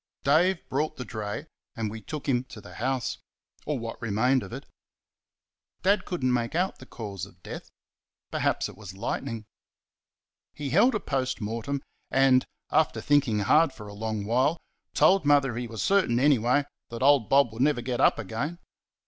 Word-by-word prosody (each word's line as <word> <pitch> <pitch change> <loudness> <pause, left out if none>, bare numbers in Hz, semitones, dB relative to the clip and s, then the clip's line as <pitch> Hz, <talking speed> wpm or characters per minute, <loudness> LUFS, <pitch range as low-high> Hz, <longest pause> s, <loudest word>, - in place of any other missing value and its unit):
Dave 170 +6 +3
brought 150 +4 -1
the 125 - -5
dray, 105 -3 -5 0.3
and 110 -2 -2
we 110 0 -7
took 150 +7 -6
him 125 -3 +2
to 115 - -11
the - - -12
house 130 +1 -2 0.5
or 150 -1 0
what 115 -1 -6
remained 120 +4 +2
of - - -9
it. 135 +4 -7 1.2
Dad 200 0 +3
could 175 -7 -4
n't 130 -1 +3
make 120 +3 -1
out 185 +3 0
the 130 - -12
cause 100 -5 -7
of 90 -2 -21
death - - -8 0.6
perhaps - - 0
it - - -11
was 100 -3 -10
lightning. 115 +1 -3 1.1
He 145 -3 -4
held 220 - +5
a - - +1
POST 130 -6 -2
MORTEM, 115 +6 -3 0.3
and, 135 -1 +4 0.3
after 155 +1 +2
thinking 140 -8 +2
hard 150 +6 +4
for 105 -3 -10
a 100 - -9
long 110 -1 -3
while, 130 +9 +2 0.4
told 195 -1 +5
Mother 140 -4 +3
he 120 0 -3
was 115 -1 -4
certain, 185 -12 +3
anyway, 130 0 +3 0.3
that 115 +2 -4
old 140 -5 +5
Bob 135 -5 +4
would 115 - -4
never 140 -3 +3
get 125 +1 -1
up - - +5
again. 145 +10 -4
130 Hz, 175 wpm, -27 LUFS, 115-145 Hz, 1.2 s, held